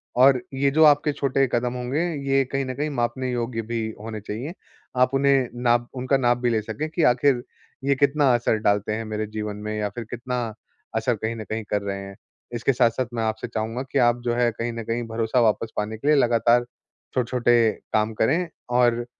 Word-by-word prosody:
और 130 0 +5
ये 140 +1 +2
जो 160 +2 +4
आपके 145 0 +5
छोटे 135 -1 +1
कदम 120 +1 0
होंगे, 125 +4 -2 0.3
ये 135 0 +4
कहीं 135 +1 -2
न 130 - -4
कहीं 150 +3 -2
मापने 130 -1 -2
योग्य 120 -1 -2
भी 115 - -1 0.2
होने 110 0 -6
चाहिए। 115 +10 -5 0.5
आप 125 +1 +3
उन्हें 135 -2 +3 0.2
नाप 120 0 +3
उनका 130 +2 +1
नाप 120 -2 +2
भी 120 -1 0
ले 110 -2 +1
सके 110 +9 -4
कि 165 +1 -1
आखिर 125 0 +2 0.4
ये 140 0 +2
कितना 140 +2 +2
असर 120 -2 +2
डालते 105 +1 +1
हैं 110 +1 -3
मेरे 110 0 -3
जीवन 105 -1 -4
में 110 - -2
या 105 -1 -1
फिर 120 - -4
कितना 125 +1 -3 0.6
असर 115 +2 +1
कहीं 110 +2 -3
न 110 - -6
कहीं 110 +1 -4
कर 105 -1 0
रहे 100 -1 -4
हैं। 100 0 -9 0.4
इसके 120 +3 +1
साथ-साथ 120 +1 +2
मैं 115 -1 -1
आपसे 110 0 -2
चाहूँगा 115 +3 -3
कि - - +2
आप 120 0 +3
जो 120 - +1
है 120 -1 +2
कहीं 115 +1 -3
न 115 -1 -5
कहीं, 115 +2 -2
भरोसा 115 +2 0
वापस 110 0 +1
पाने 110 +1 -2
के 140 - -5
लिए 150 - +6
लगातार 120 -2 +3 0.5
छोटे-छोटे 120 -2 +3 0.2
काम 110 +1 +1
करें 165 +11 +1 0.3
और 120 -1 +3
120 Hz, 205 wpm, -24 LUFS, 110-130 Hz, 0.6 s, लिए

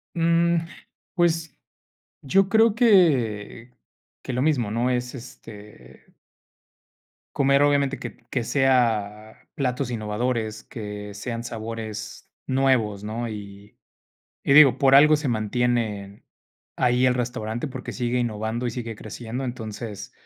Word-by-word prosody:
Mm, 170 0 +3 0.6
pues 165 -3 0 0.7
yo 190 +8 +2
creo 220 +1 +4
que 130 - +2 0.5
que - - -5
lo 125 - -1
mismo, 135 -8 +1
¿no? 120 +3 0
Es, 125 0 -2
este 105 - -13 1.2
comer, 140 0 +3
obviamente, 140 -1 +2
que - - -8
que 125 - -1
sea 115 -5 0
platos 130 -3 -2
innovadores, 110 0 -2
que 105 -2 -7
sean 115 +3 -5
sabores 110 -2 -7 0.2
nuevos, 130 -7 +1
¿no? 115 +3 -4
Y 100 -1 -10 0.7
y - - +2
digo, 140 -3 +7
por 135 -1 +4
algo 150 +2 +7
se 150 -2 -3
mantienen 110 -3 -1 0.5
ahí 125 +1 +2
el 125 - +3
restaurante, 120 0 -3
porque 130 -2 -7
sigue 125 0 -1
innovando 115 +1 -2
y - - -1
sigue 115 -1 -5
creciendo. 115 +4 -6
Entonces, 110 -3 -6
120 Hz, 120 wpm, -24 LUFS, 110-135 Hz, 1.2 s, digo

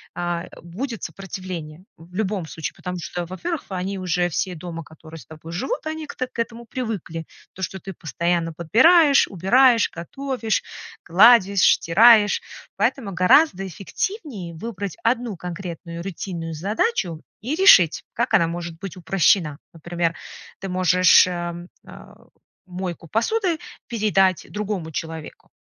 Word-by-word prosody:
А, 175 -1 -2
э, - - -14 0.2
будет 225 +8 -6
сопротивление. 185 -4 -7
В 170 +3 -16
любом 195 -4 -2
случае, 160 0 -5
потому 180 0 -5
что, 175 +1 -5
во-первых, 295 - -5
они 190 +1 -3
уже 180 -1 0
все 180 +2 -2
дома, 165 0 -7
которые 160 +1 -13
с - - -14
тобой 160 +1 -11
живут, 260 - -3
они 315 0 -4
к - - -9
так 255 0 -4
к - - -10
этому 230 0 -4
привыкли. 210 -10 -5 0.3
То, 190 - -11
что 190 +1 -4
ты 195 +2 -8
постоянно 170 +2 -1
подбираешь, 280 - +5
убираешь, 230 +6 +4
готовишь, 235 +5 -2 0.4
гладишь, 200 +1 +6
стираешь. 210 +3 +5 0.4
Поэтому 230 -9 0
гораздо 195 - +4
эффективнее 200 - -5
выбрать 200 0 -6
одну 230 -3 0
конкретную 170 -1 -7
рутинную 170 -3 -5
задачу 185 - -1 0.2
и 255 +8 -2
решить, 195 - +6
как - - -1
она 170 - +5
может 170 0 -5
быть 195 -2 -7
упрощена. 170 -3 +2
Например, 170 0 -2 0.4
ты 195 - -6
можешь, 185 0 +5
э, 175 -1 -3 0.3
а, - - -13 0.5
мойку 180 -2 -6
посуды 335 - 0 0.3
передать 195 -6 +1
другому 200 -6 -4
человеку. 160 0 -7
185 Hz, 135 wpm, -22 LUFS, 170-225 Hz, 0.5 s, гладишь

